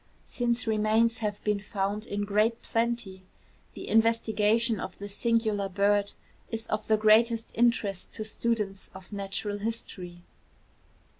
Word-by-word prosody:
Since 240 -1 -1
remains 220 +1 +2
have 210 -2 -3
been 210 -1 +1
found 205 +1 -3
in 205 0 -2
great 215 +3 +1
plenty, 230 -5 -1 0.5
the - - -7
investigation 225 0 +2
of - - -6
this 205 0 -6
singular 220 -4 +1
bird 200 +1 +2 0.4
is 225 0 -4
of 215 0 -3
the 220 - +4
greatest 225 +2 +4
interest 225 -5 +1
to 215 - -5
students 215 -3 -2
of 190 +2 -11
natural 205 +1 -3
history. 185 -5 -5
215 Hz, 130 wpm, -28 LUFS, 205-230 Hz, 0.5 s, the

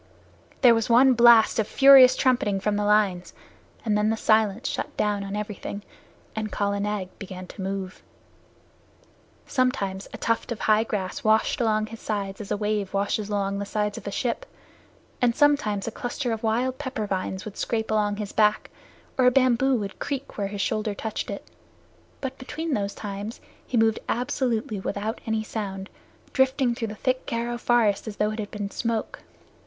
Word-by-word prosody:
There 245 -3 +8
was 225 0 0
one 255 +3 +6
blast 235 -2 +6
of 215 - +1
furious 270 -2 +8
trumpeting 240 -7 +1
from 210 +1 0
the 205 0 0
lines, 205 -4 +1 0.5
and 215 -2 +2
then 210 +1 +2
the 225 - 0
silence 215 0 +2
shut - - -4
down 205 -1 0
on 195 +1 -5
everything, 210 -1 -5 0.5
and 215 -1 -3
Kala 200 0 -1
Nag 205 -2 -2
began 185 -1 -7
to 190 - -10
move. 190 -1 -4 1.4
Sometimes 200 -7 -1
a - - -7
tuft 230 +1 -1
of 230 - -4
high 215 0 +4
grass 200 -5 -4
washed 220 +3 +2
along 215 -2 +2
his 225 +1 -10
sides 200 -2 -3
as 200 - -8
a - - 0
wave 210 -2 -2
washes 205 +1 -1
along 200 -1 -1
the 200 - -3
sides 210 -1 -1
of - - -8
a - - -2
ship, 255 - -2 0.7
and 240 -2 +3
sometimes 280 -10 +2
a - - -2
cluster 245 +2 -3
of 225 -1 -3
wild 245 +4 0
pepper 260 -6 -3
vines 190 0 -3
would 215 - -7
scrape 220 -1 -2
along 210 -1 +1
his 205 -1 -5
back, 210 -1 +2 0.5
or 250 - +6
a - - +6
bamboo 255 +1 +3
would 200 -4 -4
creak 280 -1 -4
where 200 -1 -2
his 200 0 -4
shoulder 215 0 -1
touched 220 +2 -4
it. - - -6 0.7
But 265 -1 -5
between 310 +4 -4
those 200 -3 -2
times 205 +2 -6 0.3
he 245 - -1
moved 225 0 +3
absolutely 240 -3 -1
without 205 +4 -3
any 220 -1 0
sound, 195 -3 -5 0.4
drifting 265 -2 +2
through 230 -1 -3
the 210 - -7
thick 255 +3 -1
Garo 235 +1 -2
forest 225 -4 +2
as 210 - -5
though 210 +1 0
it 215 - -6
had 205 -1 -4
been 205 -1 -5
smoke. 230 -2 -2
215 Hz, 180 wpm, -25 LUFS, 205-240 Hz, 1.4 s, There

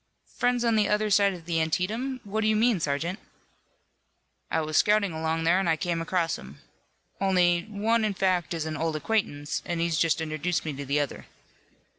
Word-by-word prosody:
"Friends 245 -1 +1
on 230 -1 +3
the 210 -1 +2
other 210 0 +1
side 200 -1 +4
of 170 -2 -12
the 165 -1 0
Antietam. 220 - -1
What 210 +2 -2
do 215 - +1
you 215 - +3
mean, 225 -2 +3
sergeant?" 165 +6 -2 1.3
"I - - +1
was 155 0 -4
scouting 210 -2 +3
along 160 +1 -1
there 170 +3 +3
and 195 -3 0
I 160 - +3
came 170 0 -2
across 165 -1 -1
'em. 70 +2 -12 0.6
Only 180 -3 +2
one 220 +2 +1
in 210 -2 0
fact 180 -3 0
is 160 -1 -3
an 155 0 -3
old 160 +1 -1
acquaintance, 150 -5 -1
an' 175 -1 -3
he's 165 -1 0
just 165 -2 +2
introduced 155 0 -2
me 155 - -3
to 140 +1 -6
the 140 +2 +1
other." 145 -2 -4
175 Hz, 195 wpm, -27 LUFS, 160-210 Hz, 1.3 s, side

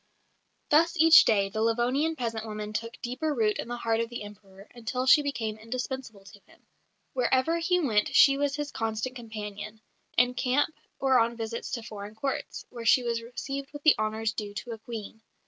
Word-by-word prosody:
Thus 330 +3 +4
each 325 +1 +8
day 200 -3 +3
the 215 +2 -3
Livonian 245 +8 +1
peasant 225 -4 -3
woman 210 0 -5
took 230 +3 -4
deeper 265 +5 -2
root 215 -3 +1
in - - -4
the 240 0 -4
heart 225 -1 0
of 230 0 -1
the 240 -3 -6
Emperor, 200 -1 -13
until 245 +2 -3
she 285 +3 +7
became 225 -7 -3
indispensable 230 -2 -5
to 205 +1 -14
him. - - -23 0.5
Wherever 260 +6 +2
he 360 +2 +2
went 220 -10 +1
she 275 - +7
was 285 0 0
his 295 0 -4
constant 225 +3 -3
companion 215 -2 -7 0.4
in 245 +1 +4
camp 265 +5 +1 0.2
or 265 -2 +3
on 235 0 +1
visits 230 0 -4
to 235 - -3
foreign 210 -2 -8
Courts, 270 +4 -4
where 235 -2 -7
she 245 +3 +5
was 235 -1 -1
received 275 +4 -6
with 290 0 -9
the 310 - +7
honours 215 0 -1
due 205 -2 -6
to 240 +3 -6
a 225 - -6
Queen. 220 -1 -8
235 Hz, 190 wpm, -28 LUFS, 215-265 Hz, 0.5 s, each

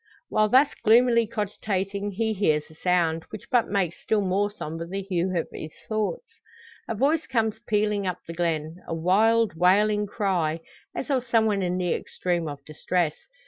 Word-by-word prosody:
While 215 0 +2
thus 270 +5 +5
gloomily 235 +1 +5
cogitating 205 -2 -2
he 220 +2 0
hears 155 -7 0
a - - -14
sound, 165 -1 +1
which 215 - -9
but 245 -2 +3
makes 190 -4 -1
still 215 -1 +1
more 195 +2 +1
sombre 165 -5 -6
the 195 +2 -4
hue 185 -1 -1
of 165 - -1
his 155 - -7
thoughts. 215 - -2 0.6
A 225 - -2
voice 290 +7 +1
comes 225 -3 0
pealing 210 -2 +1
up 180 -1 -2
the 165 - -7
glen 165 -1 -2
a 165 - -2
wild, 215 +6 +3
wailing 205 +4 +3
cry, 175 -7 -1 0.3
as 275 - -3
of 255 -2 0
some 230 -2 +3
one 205 -2 +1
in 180 0 -1
the 180 -2 0
extreme 175 -2 -2
of 145 -1 -7
distress. 155 +1 -1
195 Hz, 175 wpm, -25 LUFS, 175-220 Hz, 0.6 s, thus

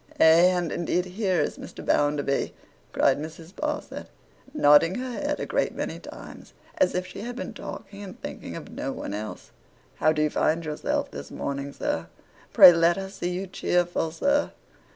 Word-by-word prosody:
Ay, - - +6 0.3
and 175 -3 -1
indeed 175 +1 0
here 185 -1 0
is 145 - -1
Mr. - - -9
Bounderby!' 145 -1 +1 0.4
cried 135 +1 +3
Mrs. 160 +3 -9
Sparsit, 300 +3 -4 0.4
nodding 165 - +5
her 255 0 -4
head 290 +4 -2
a - - -2
great - - -1
many - - -4
times, - - -11 0.3
as 180 - +3
if 180 0 -1
she 185 +2 -9
had 240 +2 -5
been 250 - -5
talking 200 0 -8
and 195 -2 -9
thinking - - -7
of - - -8
no - - -4
one - - -6
else. 105 +1 -6 0.5
'How 155 - +3
do 155 -1 +1
you 150 - +1
find 165 +1 +1
yourself 150 -1 -2
this 70 0 -8
morning, 140 0 -4
sir? 85 -10 -3 0.4
Pray 175 - +10
let 170 +1 +3
us 195 0 -6
see 175 - -3
you 180 +2 -3
cheerful, 175 -2 0
sir. 285 - +1
175 Hz, 175 wpm, -26 LUFS, 150-195 Hz, 0.5 s, Pray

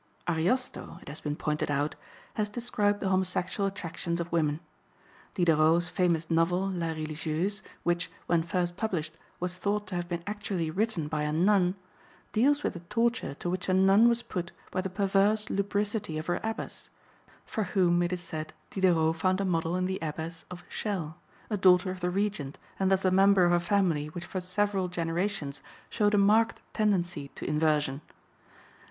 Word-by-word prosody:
Ariosto, 175 +10 0
it - - -10
has 150 - -8
been 150 -1 -2
pointed 150 -1 -1
out, 145 +1 0 0.4
has 210 -1 -1
described 210 -3 0
the 195 - 0
homosexual 185 +1 0
attractions 170 -3 -3
of 170 0 -4
women. 155 -3 +1 0.8
Diderot's 170 -1 +4
famous 170 -3 +1
novel, 175 +3 +2
La 175 -3 -2
Religieuse, 155 +6 -2 0.2
which, 175 0 0 0.2
when 170 -1 +2
first 175 +1 -1
published, 175 -8 -2 0.3
was 180 0 -2
thought 205 +3 -1
to 185 - -8
have 175 0 -3
been 170 -1 -3
actually 200 -6 -2
written 195 -4 0
by 150 0 -2
a 150 0 0
nun, 180 +2 +3 0.6
deals 285 +6 +3
with - - 0
the 175 - -7
torture 230 - 0
to 175 - -6
which 180 +1 -2
a 185 - +4
nun 195 +5 +6
was 235 0 +1
put 175 -2 -4 0.2
by 185 - 0
the 190 - -3
perverse 200 +2 +2
lubricity 205 -3 -1
of 155 - -4
her 175 - 0
abbess, 220 +1 -4 0.6
for 215 - -2
whom, 180 -2 +3
it 175 0 0
is 180 -1 -2
said, 155 -2 -6 0.2
Diderot 165 -4 +3
found 185 +3 +1
a 200 - 0
model 165 -1 0
in 185 0 0
the 190 +1 -2
Abbess 160 +1 -5
of 180 -1 -8
Chelles, 180 -8 -3 0.4
a 210 - +1
daughter 185 0 +5
of 185 - -6
the 180 0 0
Regent 190 -7 -2 0.2
and 190 -1 +2
thus 190 0 +2
a 185 - +4
member 195 0 +5
of 175 - +4
a 175 - +4
family 175 -5 +1
which 170 +3 -7
for 185 +1 -4
several 195 +1 0
generations 170 -3 -2 0.3
showed 210 0 +2
a - - +4
marked 215 +3 +3
tendency 175 -8 0
to - - -5
inversion. 150 -2 +1
180 Hz, 175 wpm, -29 LUFS, 165-200 Hz, 0.8 s, nun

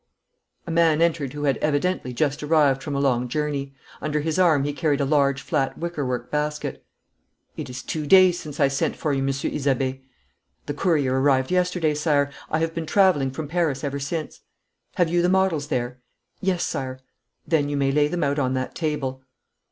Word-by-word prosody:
A 170 - -5
man 165 -2 +3
entered 160 -5 +1
who 150 0 -5
had 140 -2 +2
evidently 150 -1 0
just 145 +3 -1
arrived 150 -3 +3
from 145 -2 -4
a - - 0
long 125 -3 +1
journey. 140 0 -3 0.3
Under 150 0 -1
his 160 +3 -1
arm 160 -6 +4
he 145 +1 -2
carried 145 -1 0
a 140 - +1
large 140 -1 +2
flat 140 -4 -1
wickerwork 145 -8 -3
basket. 150 0 -2 0.7
'It - - -6
is 125 -1 -7
two 155 -2 -4
days 185 0 +6
since 150 -3 -8
I 140 - +5
sent 135 0 -1
for 150 - -1
you, 135 - 0
Monsieur 135 0 -1
Isabey.' 135 -2 -1 0.6
'The 145 - -3
courier 145 -5 +1
arrived 135 0 +2
yesterday, 180 -3 +1
Sire. 145 -2 +1 0.2
I 155 - +1
have 165 0 -1
been 165 -1 -4
travelling 185 -9 +3
from 150 +3 -5
Paris 155 -4 -1
ever 140 -1 -2
since.' 155 +2 -4 0.6
'Have 175 -2 +2
you 175 +1 +2
the 175 - +2
models 185 -6 +1
there?' 125 -3 -2 0.4
'Yes, 185 -2 0
Sire.' 130 -1 -4 0.5
'Then 150 -4 +1
you 145 - -1
may 135 -1 +2
lay 145 +1 +3
them 170 +2 -2
out 140 +1 0
on 130 -1 0
that 130 0 -3
table.' 145 -5 -3
145 Hz, 190 wpm, -24 LUFS, 135-160 Hz, 0.7 s, days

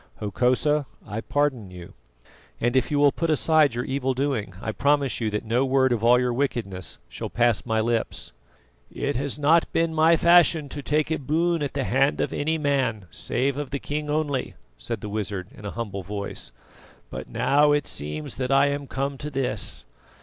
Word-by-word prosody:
Hokosa, 130 +7 +1 0.2
I 105 +2 -4
pardon 135 -9 -1
you, 90 -1 -11 0.7
and 120 +2 0
if 130 - +2
you 145 - 0
will 145 0 +5
put 165 +3 -2
aside 155 -3 +3
your 120 - -2
evil 135 -1 -1
doing, 125 -9 -2
I 110 0 -3
promise 140 +1 +1
you 110 - 0
that 105 +1 -3
no 120 +4 +1
word 130 -1 +2
of 115 -2 0
all 120 +1 +6
your 125 -1 0
wickedness 115 -9 -3
shall - - -6
pass 120 -1 +1
my 110 -1 +1
lips." 115 0 -2 0.6
"It - - -2
has 140 +1 -2
not 155 +3 +3
been 165 0 +1
my 160 +1 +5
fashion 170 -3 +4
to 145 - -6
take 150 +2 0
a 160 - 0
boon 165 +4 0
at 140 -1 -3
the 140 - 0
hand 135 +3 +2
of - - -1
any 160 +2 0
man, 135 -9 0
save 135 +3 -1
of 145 -2 -4
the 140 - -2
king 150 +2 -4
only," 145 -3 -1 0.2
said - - -5
the 105 - -5
wizard 100 -3 -4
in 105 - -12
a - - -3
humble 100 -4 -4
voice; 100 -8 -5 0.6
"but - - -7
now 145 +1 +3
it 145 -1 +2
seems 75 +1 -4
that 130 0 -2
I 140 +1 +5
am 140 0 -3
come 135 +1 -3
to 150 - -4
this. 130 - -1
135 Hz, 195 wpm, -25 LUFS, 115-145 Hz, 0.7 s, all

